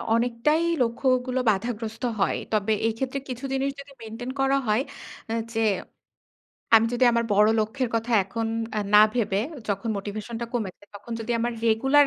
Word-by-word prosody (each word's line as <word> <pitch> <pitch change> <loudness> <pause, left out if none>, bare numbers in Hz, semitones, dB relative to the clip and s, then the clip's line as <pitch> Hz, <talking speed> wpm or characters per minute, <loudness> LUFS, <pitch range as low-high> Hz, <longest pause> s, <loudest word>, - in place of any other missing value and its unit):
অনেকটাই 245 +7 +1 0.2
লক্ষ্যগুলো 255 +1 +1
বাধাগ্রস্ত 225 +2 -2 0.2
হয়। 195 - +2 0.2
তবে 215 0 +1 0.2
এইক্ষেত্রে 255 +4 -2
কিছু 255 +2 -5
জিনিস 270 +1 0
যদি 280 0 -11
মেইনটেইন 225 +3 -6
করা 270 +1 +3
হয় 215 +3 +3 0.5
আ - - 0 0.2
যে, 225 - 0 1.1
আমি 225 0 +7
যদি 245 +1 +3
আমার 235 0 +2
বড় 210 +1 +5
লক্ষ্যের 240 +4 -1
কথা 230 +1 -1
এখন 225 +3 -3 0.5
না 210 - +10
ভেবে 210 -5 +1 0.3
যখন 200 +3 -2
মোটিভেশনটা 215 +4 -5
কমেছে, 205 -4 -3
তখন 230 +3 -8
যদি 230 +2 -2
আমার 240 +1 0
রেগুলার 270 +6 +5
230 Hz, 150 wpm, -25 LUFS, 220-255 Hz, 1.1 s, না